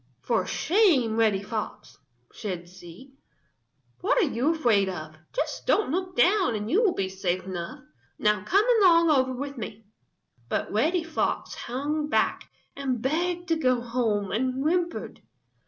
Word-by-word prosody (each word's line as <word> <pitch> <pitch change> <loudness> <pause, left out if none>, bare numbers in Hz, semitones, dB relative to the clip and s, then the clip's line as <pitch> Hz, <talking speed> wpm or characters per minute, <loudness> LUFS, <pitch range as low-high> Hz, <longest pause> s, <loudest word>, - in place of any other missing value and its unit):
"For 220 -6 0
shame, 310 - +2
Reddy 215 -3 +2
Fox!" 215 +1 -6 0.4
said 180 -5 -5
she. 180 +8 -14 0.9
"What 445 +8 +1
are - - +5
you 270 +6 +1
afraid 220 -10 +2
of? 155 -3 -7 0.2
Just - - -3
don't 415 -9 +2
look 365 +2 -2
down 375 - +3
and 210 +1 -4
you 390 +8 +4
will 415 -6 +2
be 195 - -1
safe 185 -1 -2
enough. 175 -3 -6 0.4
Now 210 -2 +1
come 395 - +3 0.2
along 335 -3 +6
over 260 -3 +3
with 275 +1 -5
me." 215 0 -7 0.6
But - - -2
Reddy 320 - +1
Fox 325 -1 -2
hung 295 +4 -3
back - - 0 0.3
and 265 -3 -2
begged 345 +7 -1
to 330 - +3
go 255 -6 +2
home 230 -5 -1
and 255 +4 0
whimpered. 345 +2 -1
255 Hz, 150 wpm, -26 LUFS, 210-330 Hz, 0.9 s, along